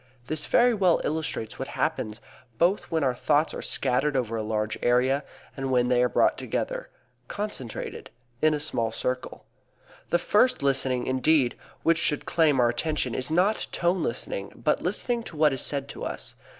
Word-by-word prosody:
This 155 Hz, +3 st, -3 dB
very 245 Hz, 0 st, +4 dB
well 185 Hz, -6 st, +3 dB
illustrates 150 Hz, -8 st, -3 dB
what 135 Hz, -, -3 dB
happens, 115 Hz, -8 st, -2 dB, 0.4 s
both 180 Hz, -, +2 dB
when 160 Hz, -2 st, 0 dB
our 130 Hz, -2 st, +2 dB
thoughts 145 Hz, +5 st, +1 dB
are -, -, -5 dB
scattered 135 Hz, +3 st, 0 dB
over 115 Hz, -3 st, -1 dB
a 110 Hz, -, -1 dB
large 110 Hz, 0 st, -1 dB
area, 130 Hz, +3 st, +2 dB, 0.3 s
and 135 Hz, 0 st, -3 dB
when 125 Hz, -1 st, +2 dB
they 125 Hz, -1 st, +3 dB
are 125 Hz, -, +3 dB
brought -, -, +2 dB
together -, -, -3 dB, 0.4 s
concentrated 200 Hz, -, -5 dB, 0.3 s
in 155 Hz, 0 st, +4 dB
a -, -, -3 dB
small 120 Hz, -7 st, -1 dB
circle. 125 Hz, +3 st, -4 dB, 0.6 s
The 175 Hz, -, +3 dB
first 210 Hz, -, +2 dB
listening 130 Hz, -2 st, +1 dB
indeed 130 Hz, 0 st, +2 dB, 0.3 s
which 165 Hz, 0 st, +3 dB
should 150 Hz, -3 st, 0 dB
claim 155 Hz, -5 st, +3 dB
our 120 Hz, -1 st, +4 dB
attention 150 Hz, -1 st, -1 dB
is 130 Hz, -, -3 dB
not 185 Hz, +7 st, +2 dB
tone 175 Hz, +1 st, +1 dB
listening, 100 Hz, -6 st, -3 dB
but 135 Hz, +6 st, 0 dB
listening 235 Hz, +6 st, -1 dB
to 160 Hz, -, -9 dB
what 150 Hz, -2 st, +4 dB
is 135 Hz, -, -3 dB
said 140 Hz, -1 st, -2 dB
to -, -, -7 dB
us. -, -, -5 dB
140 Hz, 175 wpm, -26 LUFS, 125-165 Hz, 0.6 s, very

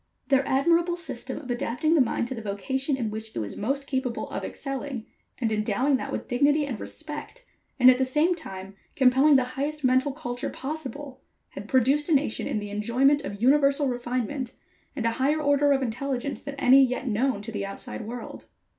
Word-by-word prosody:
Their 270 Hz, -1 st, +4 dB
admirable 340 Hz, +6 st, +2 dB
system 265 Hz, -6 st, -5 dB
of 260 Hz, -5 st, -6 dB
adapting 245 Hz, +6 st, 0 dB
the 320 Hz, -, +5 dB
mind 235 Hz, -1 st, 0 dB
to -, -, -3 dB
the 230 Hz, -, -6 dB
vocation 265 Hz, +7 st, -2 dB
in 225 Hz, -4 st, -2 dB
which 220 Hz, +1 st, -7 dB
it -, -, -4 dB
was 105 Hz, -2 st, -5 dB
most 275 Hz, +6 st, -2 dB
capable 260 Hz, -3 st, -2 dB
of -, -, -4 dB
excelling, 270 Hz, -3 st, -5 dB, 0.3 s
and 230 Hz, -4 st, -1 dB
endowing 220 Hz, +6 st, +1 dB
that -, -, -5 dB
with -, -, -4 dB
dignity 290 Hz, +4 st, +2 dB
and 250 Hz, -7 st, -5 dB
respect, 315 Hz, +11 st, -6 dB, 0.3 s
and, 250 Hz, -, +7 dB
at 255 Hz, 0 st, +7 dB
the -, -, +3 dB
same 300 Hz, +7 st, +2 dB
time, 195 Hz, -, -8 dB, 0.2 s
compelling 270 Hz, +2 st, +5 dB
the 260 Hz, -, +5 dB
highest 285 Hz, +4 st, -4 dB
mental 260 Hz, +2 st, +3 dB
culture 245 Hz, -4 st, -4 dB
possible, 285 Hz, -2 st, -6 dB, 0.3 s
had 205 Hz, -, -9 dB
produced 270 Hz, +5 st, +3 dB
a 320 Hz, -, +5 dB
nation 270 Hz, -5 st, 0 dB
in -, -, -1 dB
the 205 Hz, -1 st, -5 dB
enjoyment 250 Hz, +8 st, +2 dB
of 200 Hz, +2 st, -6 dB
universal 280 Hz, +1 st, +4 dB
refinement, 245 Hz, +1 st, -3 dB, 0.4 s
and 240 Hz, -5 st, -3 dB
a 230 Hz, -, +3 dB
higher 295 Hz, +4 st, +2 dB
order 285 Hz, -1 st, +3 dB
of 270 Hz, -1 st, +2 dB
intelligence 260 Hz, +3 st, -3 dB
than 280 Hz, 0 st, -7 dB
any 270 Hz, 0 st, +6 dB
yet 255 Hz, +1 st, -1 dB
known 230 Hz, -1 st, 0 dB
to 225 Hz, -, -6 dB
the 205 Hz, -2 st, -3 dB
outside 195 Hz, +3 st, -6 dB
world. 240 Hz, 0 st, -8 dB
265 Hz, 190 wpm, -26 LUFS, 235-285 Hz, 0.4 s, and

